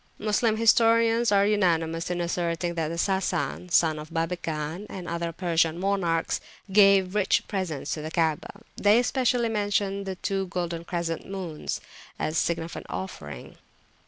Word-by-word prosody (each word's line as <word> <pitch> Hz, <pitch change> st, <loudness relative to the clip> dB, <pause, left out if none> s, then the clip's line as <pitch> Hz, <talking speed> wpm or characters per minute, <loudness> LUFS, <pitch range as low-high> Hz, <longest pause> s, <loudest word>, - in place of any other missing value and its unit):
Moslem 215 Hz, +1 st, +1 dB
historians 230 Hz, 0 st, +4 dB
are 200 Hz, 0 st, +4 dB
unanimous 170 Hz, -5 st, +1 dB
in 175 Hz, -1 st, -1 dB
asserting 170 Hz, 0 st, -1 dB
that 165 Hz, -2 st, -2 dB
Sasan, 190 Hz, -1 st, -1 dB
son 160 Hz, -3 st, +3 dB
of 155 Hz, +1 st, -9 dB
Babegan, 165 Hz, +1 st, -3 dB
and 180 Hz, -3 st, -7 dB
other 170 Hz, 0 st, -2 dB
Persian 165 Hz, -1 st, +1 dB
monarchs, 180 Hz, -4 st, 0 dB, 0.3 s
gave 195 Hz, -2 st, +5 dB
rich 205 Hz, -2 st, +2 dB
presents 170 Hz, -8 st, -3 dB
to 155 Hz, -, -4 dB
the 155 Hz, -, -5 dB
Kaabah; 165 Hz, +6 st, -1 dB
they 205 Hz, +2 st, +4 dB
especially 245 Hz, -1 st, +2 dB
mention 200 Hz, -2 st, -1 dB
two 195 Hz, -2 st, -1 dB
golden 170 Hz, -2 st, -3 dB
crescent 170 Hz, 0 st, -3 dB
moons, 185 Hz, -6 st, -4 dB, 0.4 s
a -, -, -1 dB
significant 165 Hz, +1 st, -2 dB
offering. 75 Hz, -, -7 dB
180 Hz, 130 wpm, -26 LUFS, 165-200 Hz, 0.4 s, gave